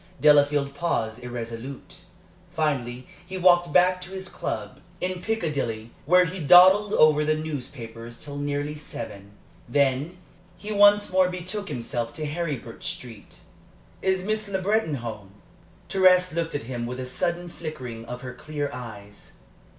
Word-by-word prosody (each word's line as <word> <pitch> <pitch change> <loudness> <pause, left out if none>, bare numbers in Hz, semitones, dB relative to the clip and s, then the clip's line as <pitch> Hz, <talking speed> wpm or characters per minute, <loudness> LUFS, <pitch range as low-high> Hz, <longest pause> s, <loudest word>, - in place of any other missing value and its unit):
Delafield 145 -1 +4
paused 125 -7 -2
irresolute. 120 +2 -7 0.5
Finally 130 -6 -2 0.2
he 185 +1 -7
walked 175 -2 +4
back 180 +2 +4
to 180 - -6
his 190 0 -5
club 105 -2 -5 0.2
in 185 0 -3
Piccadilly, 140 - -2 0.2
where 180 +2 +6
he 180 +2 -5
dawdled 185 +6 +7
over 155 -1 +5
the 155 0 +2
newspapers 120 -6 -6
till 145 -1 -8
nearly 145 +1 -2
seven. 105 -9 -8 0.4
Then 140 +5 +1 0.4
he 210 - -7
once 205 0 +5
more 185 0 +4
betook 185 +3 -5
himself 120 -3 -3
to 155 - -4
Heribert 145 -7 -4
Street. 115 -5 -7 0.6
"Is 190 -1 +1
Miss 215 +1 -1
Le 195 -1 -1
Breton 200 -5 +1
at 125 - -6
home?" 105 -4 -7 0.5
Thérèse 185 -2 +4
looked 165 -1 -2
at 145 - -2
him 120 0 -4
with 125 +1 -5
a 130 - -3
sudden 175 +7 -2
flickering 135 -9 -7
of 125 +1 -7
her 125 -1 -7
clear 145 +1 -4
eyes. 105 -5 -10
150 Hz, 145 wpm, -25 LUFS, 125-180 Hz, 0.6 s, dawdled